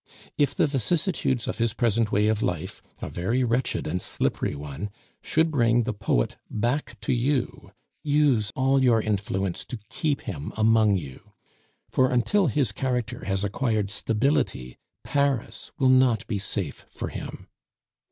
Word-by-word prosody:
If 145 -3 +1
the - - +3
vicissitudes 140 - 0
of - - -3
his 115 -1 +1
present 115 -2 +1
way 105 +1 +3
of 110 0 +1
life 85 -5 -3 0.2
(a - - -2
very 115 +9 0
wretched 125 +2 0
and 90 +4 -2
slippery - - -1
one) 75 +7 -6 0.3
should 160 +1 +1
bring 120 -4 +3
the 115 -1 -2
poet 95 - 0
back 120 +1 -2
to 110 - 0
you, 130 +2 -1 0.3
use 145 -8 +2
all 135 +1 +3
your 120 -3 +4
influence 100 -3 -1
to 125 - -6
keep 145 +3 -1
him 80 - -6
among 110 -2 +4
you; 70 -7 -9 0.6
for 130 0 +3
until 165 - +2
his 135 -4 +1
character 125 -1 -2
has 95 0 0
acquired 105 -1 0
stability, 110 - 0 0.2
Paris 140 -4 -1
will 130 -2 +3
not 130 -4 +4
be 105 -4 -2
safe 95 -6 -3
for - - -5
him. - - -7
115 Hz, 150 wpm, -26 LUFS, 100-130 Hz, 0.6 s, your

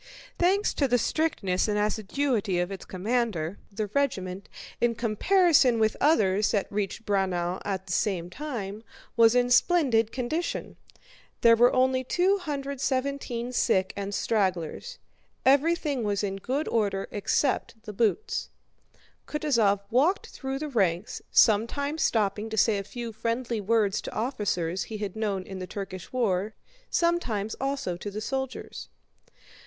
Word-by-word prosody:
Thanks 385 +4 +2
to 280 - +1
the 245 -1 +3
strictness 215 - 0
and 210 -1 0
assiduity 215 0 0
of 175 +2 -1
its 195 - -7
commander 200 -4 -2
the 210 +2 -2
regiment, 200 -6 -2 0.3
in 240 -1 +2
comparison 255 - +3
with 220 -1 +2
others 210 -9 +3
that 200 -3 +1
had - - -28
reached 205 +2 -3
Braunau 185 -3 0
at 190 -2 -3
the 185 - -7
same 175 -2 0
time, 215 -4 -5 0.3
was 230 0 +5
in 245 0 +2
splendid 245 -8 +3
condition. 285 +7 -3 0.7
There 230 0 +7
were 240 +2 +5
only 260 0 +2
217 280 -7 -1
sick 190 -5 +1
and 200 0 -4
stragglers. 195 - -1 0.5
Everything 285 -1 +3
was 205 -1 -1
in 195 -1 -2
good 265 +10 -2
order 200 -4 0
except 220 +1 -1
the 215 -3 -7
boots. 425 - 0 0.8
Kutúzov 230 -10 +2
walked 310 - +2
through 265 0 -4
the 305 +2 -4
ranks, 190 -6 0
sometimes 280 +8 +3
stopping 210 0 +1
to 220 - -4
say 210 -1 +3
a - - -4
few 235 +2 -6
friendly 230 +1 -2
words 210 -1 +1
to - - -7
officers 195 -8 -1
he 220 - -6
had 205 -2 -4
known 205 -4 -1
in 190 0 -8
the 185 - -5
Turkish 190 -3 -7
war, 215 -4 0 0.3
sometimes 245 - 0
also 270 -9 -2
to 205 - -6
the 205 +1 -5
soldiers. 265 - -5
225 Hz, 140 wpm, -27 LUFS, 200-270 Hz, 0.8 s, There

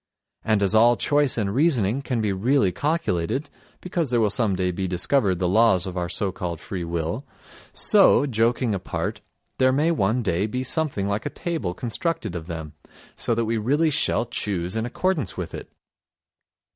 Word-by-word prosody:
And 110 -2 +2
as 100 - +2
all 120 +2 +5
choice 145 -3 +1
and 100 -3 -1
reasoning 130 - +2
can 125 -4 -2
be 105 -2 0
really 110 +1 +2
calculated—because 145 - -3
there 120 -1 +2
will 105 -3 +2
some 105 -4 +1
day 90 0 0
be 95 +1 -3
discovered 95 +2 +1
the 90 0 0
laws 95 -1 +4
of 95 -1 -4
our 90 -1 -2
so 100 0 0
called 85 -3 -5
free 90 0 -5
will—so, 85 - +1
joking 115 -1 +1
apart, 95 -1 -4 0.4
there 130 0 +4
may 150 +5 +2
one 120 -4 +1
day 95 +1 0
be 125 +4 -3
something 130 -8 -1
like 100 +2 -2
a - - -2
table 140 - -4
constructed 115 - -3
of 80 -1 -6
them, 80 -3 -6 0.4
so 115 - -1
that 115 0 0
we 115 +1 -1
really 145 +9 +1
shall 140 - +1
choose 95 -6 -3
in 110 +1 -1
accordance 150 - -1
with 90 -3 -5
it. - - -8
110 Hz, 170 wpm, -24 LUFS, 95-130 Hz, 0.4 s, all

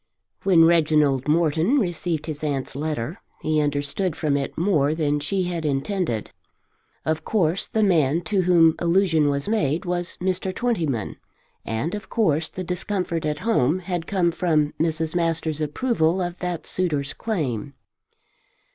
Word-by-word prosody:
When 175 -4 +5
Reginald 150 -5 +3
Morton 165 - +2
received 175 - -1
his 155 -2 -6
aunt's 140 -3 -2
letter 150 +1 -3 0.2
he 155 -1 +2
understood 145 +4 -1
from 150 -3 0
it 140 -1 -3
more 155 -5 +2
than 150 -2 0
she 185 +6 -1
had 175 -2 -3
intended. 145 - -1 0.7
Of 160 0 -1
course 180 -4 +1
the 220 - 0
man 165 -5 +3
to 195 +2 0
whom 170 -3 +5
allusion 170 -4 +3
was 140 0 -2
made 165 -8 0
was 175 0 -3
Mr. 185 +1 -1
Twentyman; 160 - -1 0.5
and 115 +10 -2
of 210 0 -6
course 160 -9 +1
the 185 - -6
discomfort 180 -2 -2
at 150 -1 -1
home 175 - +2
had 175 -2 -4
come 180 -3 +1
from 155 -4 +1
Mrs. 160 0 0
Masters' 165 -2 0
approval 165 - +1
of 175 -1 -2
that 180 -2 -3
suitor's 150 -6 -1
claim. 140 - -3
165 Hz, 145 wpm, -23 LUFS, 150-180 Hz, 0.7 s, When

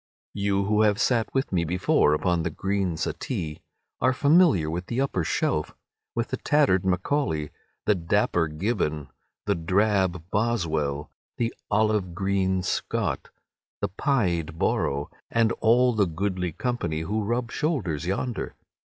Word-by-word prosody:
You 100 -1 0
who 105 +1 +2
have 105 -1 +3
sat 120 -3 +1
with 135 0 -1
me 90 -3 +1
before 85 -3 +2
upon 85 +2 +1
the 85 - -1
green 95 0 -1
settee 75 0 -3 0.4
are 130 - +4
familiar 145 - +4
with 85 +3 -3
the 120 - -2
upper 135 -10 0
shelf, 75 -1 -1 0.4
with 115 0 -1
the - - -2
tattered 140 -12 +3
Macaulay, 90 - 0 0.3
the 105 - +4
dapper 90 -2 +1
Gibbon, 75 - -2 0.4
the - - +2
drab 95 0 +1
Boswell, 80 -10 0 0.3
the 115 -1 -1 0.2
olive 105 -4 +1
green 95 -1 0
Scott, - - -2 0.5
the - - -1
pied 90 - 0
Borrow, 70 -3 0 0.2
and 115 -1 +2
all 120 +2 +4
the 105 -3 +2
goodly 90 +1 -2
company 85 - -2
who 105 +7 -1
rub 120 +3 -1
shoulders 100 - -1
yonder. 115 +6 -2
95 Hz, 135 wpm, -26 LUFS, 85-115 Hz, 0.5 s, are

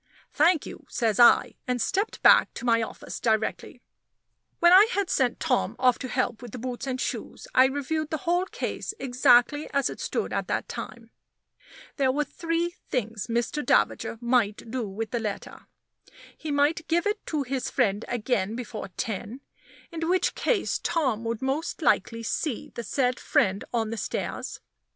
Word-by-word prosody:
"Thank 320 +1 +3
you," - - -10
says 225 -3 0
I; 240 - +6
and 250 -1 0
stepped 400 - -1
back - - +7
to 240 - -6
my 230 -1 +3
office 220 - -6
directly. 220 -2 -1 0.7
When 345 +1 +6
I 395 +4 +9
had 400 -2 0
sent 255 -3 +1
Tom 265 -6 0
off 250 -1 +3
to 260 - -4
help 250 -2 -1
with 245 -4 -10
the - - -5
boots 250 +2 -5
and 260 -1 -2
shoes, - - -4
I 255 - +7
reviewed 285 +3 -2
the 315 +3 -4
whole 355 +2 +1
case 425 - -4
exactly 255 +2 +3
as 280 -2 +1
it - - -9
stood - - -2
at - - -2
that - - -2
time. - - -8 0.9
There 270 -3 +3
were 295 +3 0
three 335 +2 -2 0.2
things 225 -4 -2
Mr. 235 +5 -1
Davager 230 - +1
might 235 -3 0
do 240 -5 -3
with 220 +3 -5
the 240 - -1
letter. 210 -3 -6 0.7
He 315 - -7
might 290 +3 +1
give 340 +1 +1
it 415 0 -1
to 300 -3 -1
his 265 0 -3
friend 210 -4 +1
again 220 -3 -1
before 235 -4 -6
ten 220 +4 -4 0.5
in 330 0 -3
which 365 0 +2
case 455 -6 0
Tom 275 -10 0
would 230 +1 -3
most 285 +6 -2
likely 230 0 +1
see 255 +3 -3
the - - -5
said 250 +2 0
friend 195 +1 +1
on 225 -2 -1
the 230 - -4
stairs. - - -4
255 Hz, 170 wpm, -26 LUFS, 230-310 Hz, 0.9 s, I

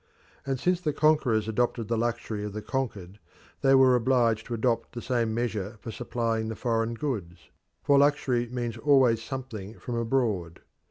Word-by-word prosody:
And 135 -2 -1
since 180 +3 +1
the 155 -4 -1
conquerors 135 -9 +2
adopted 115 0 0
the 115 - 0
luxury 115 -2 -2
of 105 -1 -5
the 105 - -4
conquered, 105 -8 -4 0.4
they 135 -1 +5
were 130 -1 +6
obliged 120 -3 +2
to 120 - -3
adopt 115 0 -1
the 120 - -5
same 120 -3 0
measure 110 -2 -3
for 115 - -7
supplying 115 -1 -2
the 110 - -4
foreign 115 -1 -1
goods 100 - -5 0.3
for 140 -1 +5
luxury 135 -4 +2
means 120 -2 -3
always 130 -4 +4
something 115 -5 -6
from 125 - -6
abroad. 115 -8 -1
115 Hz, 165 wpm, -27 LUFS, 110-130 Hz, 0.4 s, were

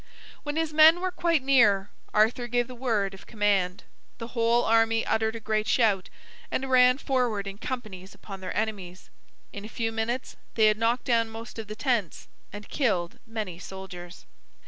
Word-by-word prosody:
When 295 0 -4
his 320 -1 -1
men 315 +2 +7
were 370 0 -2
quite 335 -5 +1
near, 210 -8 +4 0.2
Arthur 225 +3 +2
gave 240 0 +1
the 255 - -9
word 225 -6 -1
of 195 - -13
command. 200 -4 0 0.3
The 230 0 -7
whole 235 0 +2
army 225 0 +3
uttered 220 0 0
a - - -5
great 215 0 -1
shout, 210 -6 +2 0.4
and 265 0 -3
ran 250 0 +6
forward 245 -8 -1
in 195 +1 -7
companies 210 -8 -6
upon 195 -2 -10
their 185 - -5
enemies. 200 -5 -4 0.4
In 200 - -7
a - - -7
few 225 0 -2
minutes 225 +3 -3 0.2
they 220 - +4
had 215 0 +3
knocked 235 +2 +1
down 230 -3 +2
most 225 +1 -9
of 220 - -6
the 215 - -7
tents, 230 - -1 0.2
and 205 +1 -9
killed 185 - -1
many 215 -6 -5
soldiers. 185 -2 -9
225 Hz, 175 wpm, -27 LUFS, 200-245 Hz, 0.4 s, men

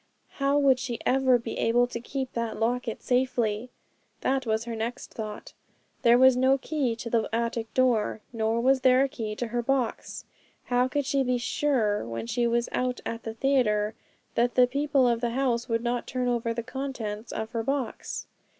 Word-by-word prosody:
How 275 +1 +2
would 275 -3 +4
she 250 -2 -3
ever 260 -1 +4
be 235 - -6
able 240 +2 +3
to 245 -1 -6
keep 260 +2 -4
that 230 -1 -3
locket 235 0 -1
safely? 245 -3 0 0.5
that 265 -2 0
was 220 0 +1
her 235 -1 -4
next 230 +2 -5
thought. 215 -2 -7 0.5
There 235 +1 +6
was 260 0 +6
no 260 +2 +4
key 270 -4 -1
to 230 - -7
the 230 -2 +1
attic 230 0 -2
door, 240 -4 +2
nor 225 0 0
was 260 +1 +3
there 255 +1 +5
a - - +2
key 225 -6 -5
to 240 +1 -4
her 240 +1 -1
box. 255 -1 -2 0.4
How 250 0 +2
could 285 +2 -1
she 275 +1 +1
be 250 -1 +1
sure, 235 -3 0
when 115 0 -5
she 235 - 0
was 235 0 +1
out 250 0 -1
at 230 0 -4
the 225 -1 -6
theatre, 220 -5 +2 0.4
that 240 +1 +1
the 250 - +7
people 275 0 +2
of 235 -1 +1
the 240 - 0
house 245 -1 0
would 230 0 0
not 240 0 -1
turn 250 -1 -2
over 235 -1 0
the 235 0 -3
contents 235 -4 -5
of 220 0 -4
her 230 -2 -1
box? 270 -1 -3
245 Hz, 190 wpm, -27 LUFS, 230-260 Hz, 0.5 s, the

